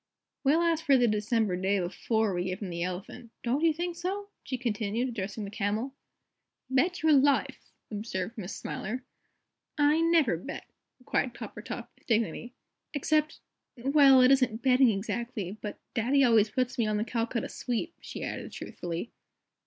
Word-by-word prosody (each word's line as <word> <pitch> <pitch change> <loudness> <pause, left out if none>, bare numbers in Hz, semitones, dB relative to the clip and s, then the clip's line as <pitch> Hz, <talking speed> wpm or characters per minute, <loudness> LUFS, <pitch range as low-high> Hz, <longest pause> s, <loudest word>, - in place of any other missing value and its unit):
"We'll 305 +5 +4
ask 330 -1 +1
for 280 -4 +5
the 245 -1 +4
December 215 -2 +1
day 190 +2 +1
before 205 +4 0
we 175 0 -1
give 185 +1 -3
him 185 - -4
the 170 0 -4
Elephant, 185 +6 -5
don't 250 +5 0
you 330 - +5
think 345 +2 -3
so?" 390 +4 -3
she 255 - -4
continued, 230 0 -1
addressing 205 -2 -4
the 200 - -7
Camel. 220 +5 -1 0.8
"Bet 345 +7 +1
your 315 -1 +6
life!" 280 0 +2 0.2
observed 205 -1 -4
Miss 200 -4 -6
Smiler. 245 +6 -4 0.7
"I 295 +1 +4
never 330 - +3
bet," 270 - -7 0.3
replied 250 -1 -1
Coppertop, - - -7
with - - -30
dignity. 230 +1 0 0.4
"Except 305 +2 +1 0.4
well, 270 +1 +6
it 255 +1 +6
isn't 255 -4 +2
betting 260 -1 +5
exactly 215 -1 -3
but 210 - -6
Daddy 260 +4 +3
always 225 -4 +5
puts 255 +3 -1
me 225 - +2
on 215 0 +1
the 215 - 0
Calcutta 235 0 -1
Sweep," 255 +8 -3
she - - -7
added, - - -5
truthfully. 175 +6 -5
235 Hz, 160 wpm, -29 LUFS, 210-275 Hz, 0.8 s, your